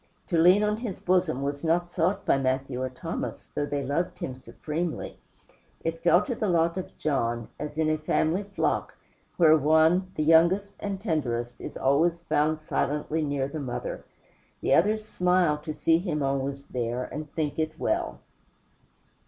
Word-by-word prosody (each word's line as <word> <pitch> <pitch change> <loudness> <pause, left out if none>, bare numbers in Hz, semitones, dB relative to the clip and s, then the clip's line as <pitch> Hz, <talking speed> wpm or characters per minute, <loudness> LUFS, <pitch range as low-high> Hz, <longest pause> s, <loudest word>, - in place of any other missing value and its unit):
To 170 - +1
lean 180 +5 +6
on 210 0 +1
his 225 -4 -5
bosom 180 -7 +1
was 140 +1 -3
not 175 +2 +1
sought 180 +3 0
by 135 - +3
Matthew 130 -1 -1
or 130 - -1
Thomas, 125 - -5
though 145 - -1
both 140 -2 -2
loved 155 +6 -1
him 130 - -4
supremely; 150 +7 -5 0.6
it 165 0 -3
fell 175 +3 +5
to 250 - -3
the 215 -3 -1
lot 170 -1 +2
of 185 - -6
John, 120 -6 -1
as 150 0 -5
in 160 -1 +2
a 155 0 +1
family 160 +4 +1
flock, 200 -1 -2 0.4
where 160 -3 +7
one, 160 +5 +3
the 155 - 0
youngest 170 +6 +4
and 200 -2 -3
tenderest, 125 - -2
is - - -6
always 160 +6 +2
found 155 -1 +1
silently 150 +1 -1
near 140 -2 -1
the 155 +3 -5
mother; 130 -4 -4 0.6
the - - +1
others 215 +5 +3
smile 180 -6 +2
to 155 +1 -5
see 160 +2 +2
him 160 -5 -2
always 140 0 -2
there, 120 0 -2
and 150 +2 -7
think 155 -1 -2
it 155 0 -2
well. 60 0 -1
155 Hz, 170 wpm, -27 LUFS, 140-175 Hz, 0.6 s, where